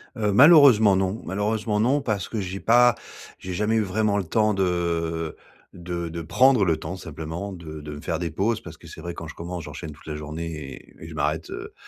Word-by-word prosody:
Heu, 105 -3 0
malheureusement 130 - +7
non 95 +4 -1
malheureusement 105 +2 -1
non, 130 +7 +3
parce 105 -7 -2
que 110 - -3
j'ai 95 0 -4
pas 120 +1 +5 0.4
j'ai 90 0 -6
jamais 105 +4 0
eu - - +3
vraiment 105 +1 0
le 100 - 0
temps 105 +5 +1
de 85 -3 -1 0.4
de 85 -1 -5
de 85 +1 -5
prendre 125 +5 +4
le 80 -2 +2
temps 85 +4 -6
simplement 80 +3 -6
de 80 -4 -8
de 75 0 -7
me 75 - -8
faire 80 - -2
des 85 -1 -2
pauses 105 +8 -1
parce 80 -2 -11
que - - -17
c'est - - -10
vrai 85 +1 -6
quand 85 - -7
je 80 - -8
commence, 85 0 -6
j'enchaîne 75 - -7
toute 75 - -16
la 75 -1 -5
journée 75 +2 -6
et 70 -3 -10
et - - -8
je - - -9
m'arrête, - - -1
heu, - - -7
95 Hz, 220 wpm, -24 LUFS, 80-105 Hz, 0.4 s, malheureusement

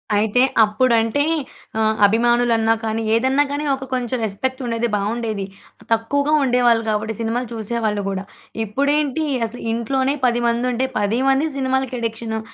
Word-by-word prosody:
అయితే 215 +4 +2 0.2
అప్పుడంటే 230 +4 +2 0.6
ఆహ్, 220 0 +2
అభిమానులన్నా 230 +1 +3
కానీ, 220 0 -1
ఏదన్నా 265 +5 +3
గానీ 290 +1 -2
ఒక 270 0 -8
కొంచెం 250 0 -1
రెస్పెక్ట్ 260 +6 -3
ఉండేది. 235 0 -1
బాగుండేది. 215 0 -2 0.5
తక్కువగా 280 +7 +1
ఉండేవాళ్ళు 245 -3 +3
గాబట్టి 215 +1 -1
సినిమాలు 235 +2 -1
చూసేవాళ్ళు 220 -1 -2
గూడా. 195 0 -3 0.4
ఇప్పుడేంటి? 285 +6 0 0.2
అసలు 230 +2 -8
ఇంట్లోనే 260 +4 0
10 240 -1 +2
మంది 235 +1 0
ఉంటే 255 +2 0
10 210 +4 0
మంది 270 +4 +2
సినిమాలకి 265 -1 -1
అడిక్షను. 225 -1 -3
235 Hz, 135 wpm, -20 LUFS, 220-260 Hz, 0.6 s, అభిమానులన్నా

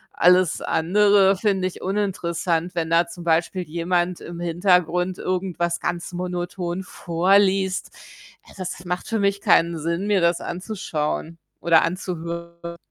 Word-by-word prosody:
Alles 180 -1 +4
andere 200 +3 +3
finde 195 -2 0
ich 185 - -9
uninteressant, 180 -3 -1
wenn 165 -1 -1
da 170 +1 +4
zum 170 +1 -10
Beispiel 170 +2 +1
jemand 175 +2 -1
im 170 0 -8
Hintergrund 180 +1 +1
irgendwas 180 -2 -2
ganz 175 0 -3
monoton 180 0 -4
vorliest. 190 +2 +1 0.6
Äh, - - -15
das 180 -1 -6
macht 180 0 -3
für 225 - -1
mich 200 0 +1
keinen 170 0 +3
Sinn, 170 +4 -2
mir 205 -3 +2
das 170 0 +2
anzuschauen 170 -4 -4 0.2
oder 165 -2 +5
anzuhören. 170 -1 -5
175 Hz, 130 wpm, -23 LUFS, 170-185 Hz, 0.6 s, oder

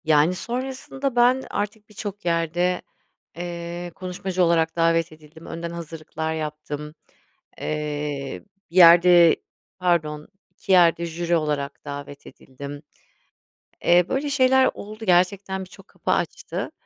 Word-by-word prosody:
Yani, 155 +3 +4
sonrasında 260 +4 -4
ben 250 +2 +4
artık 210 +1 -4
birçok 205 -1 -7
yerde, 175 +2 0 0.6
ııı, 175 0 -5
konuşmacı 185 +1 -2
olarak 165 -1 +2
davet 165 0 +2
edildim. 155 +1 -15
Önden 170 +1 -5
hazırlıklar 160 -1 -5
yaptım. 150 -1 -5 0.7
Eee, 150 -2 -3 0.3
bir - - -14
yerde, 175 -1 +8 0.4
pardon, 155 -4 0 0.2
2 - - -6
yerde 170 -2 +5
jüri 170 +1 -1
olarak 150 -3 -2
davet 145 0 -8
edildim. 140 +2 -10 1.0
Eee, 175 0 +5
böyle 275 +2 -1
şeyler 265 -1 +4
oldu. 215 +2 -9
Gerçekten 190 +1 +2
birçok 185 - -16
kapı - - -3
açtı. - - -2
170 Hz, 115 wpm, -23 LUFS, 155-190 Hz, 1.0 s, yerde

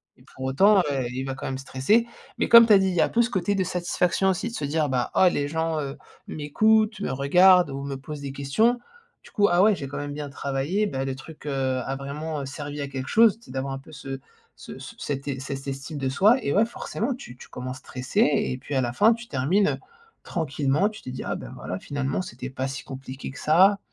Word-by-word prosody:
Et - - -22
pour 130 - -6
autant, 195 +10 +5
heu, 135 -3 -1
il 130 +1 -3
va 135 - -3
quand - - -7
même 135 - -3
stresser, 135 - +1 0.3
mais, - - +1
comme 235 0 +9
tu - - +2
as - - +9
dit, 190 - +2
il 185 - 0
y - - +3
a - - +5
un - - -4
peu 235 - +2
ce 235 - +1
côté 195 -2 0
de 190 - +1
satisfaction, 180 +1 0
aussi, 185 - -1
de - - -11
se - - -4
dire, 150 +1 0
bah: 125 -3 -1
«Ah, 185 - +5
les 145 -4 -1
gens, 160 0 -1
heu, 140 -1 -5 0.3
m'écoutent, 215 +8 +2
me - - -2
regardent 180 +7 +5
ou 135 0 -5
me 140 -1 -4
posent 145 +2 -8
des 140 -1 -5
questions. 140 - +1 0.4
Du - - -16
coup, 205 -2 +3
ah 175 +1 +4
ouais, 210 +1 +5
j'ai 140 - -6
quand 145 - -6
même 145 0 -4
bien 145 -1 -5
travaillé, 140 +9 -1
bah, 135 -8 -3
le 135 -1 -3
truc, 155 +4 -12
heu, - - -1 0.3
a 135 - -2
vraiment, 150 +3 -5
heu, - - -5
servi 145 +2 -6
à 140 - -3
quelque 135 -1 -5
chose», 225 -1 +5
tu 235 - -20
sais - - -12
d'avoir 135 +1 -3
un 135 - -5
peu 135 - -16
ce 135 -2 -7 0.4
ce - - -10
c - - -9
cette 135 -1 -4
cette 135 0 -6
estime 135 +2 -5
de 135 -2 -2
soi, 205 - +4
et 140 - -1
ouais, 210 +3 +4
forcément, 235 +2 -3
tu 245 - -10
tu - - -13
commences 130 +1 -6
stressé 130 +10 -2
et 140 - +2
puis 140 - -8
à 130 - +3
la 120 -1 -1
fin 215 - +5
tu 235 +1 -9
termines, 165 - +2
heu, - - -2 0.5
tranquillement. 150 +3 0
Tu 215 0 -12
te - - -7
dis: 130 - -6
«Ah, - - -2
bah, - - -8
voilà, 90 - -5
finalement, 140 - -2
c'était 130 -4 -7
pas 130 0 -3
si 135 0 -6
compliqué 135 0 -8
que 135 - -11
ça 190 +6 +5
145 Hz, 255 wpm, -25 LUFS, 135-190 Hz, 0.5 s, comme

